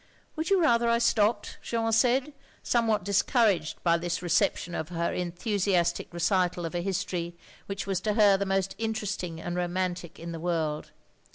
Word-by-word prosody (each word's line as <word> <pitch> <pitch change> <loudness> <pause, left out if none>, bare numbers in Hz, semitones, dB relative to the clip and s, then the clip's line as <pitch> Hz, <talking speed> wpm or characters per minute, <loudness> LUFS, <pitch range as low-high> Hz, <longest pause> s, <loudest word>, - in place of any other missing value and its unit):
"Would 315 0 -2
you 390 -1 +4
rather 235 -8 +3
I 235 - +4
stopped?" 215 -2 +1
Jeanne 225 -1 -1
said, 255 +5 +2 0.3
somewhat 225 -4 +1
discouraged 200 - +1
by 170 -1 +3
this 175 +1 -3
reception 175 0 +1
of 160 -1 -4
her 170 -1 -1
enthusiastic 180 -1 0
recital 180 0 0
of 165 - -5
a 175 - -1
history 175 -2 -3 0.3
which 195 0 -4
was 195 -2 -1
to 210 +1 0
her 205 -2 +5
the 200 0 -1
most 195 0 0
interesting 210 -6 -3
and 175 +1 -4
romantic 180 -1 -2
in 170 0 -7
the 165 - -6
world. 160 -3 -2
190 Hz, 165 wpm, -28 LUFS, 175-220 Hz, 0.3 s, her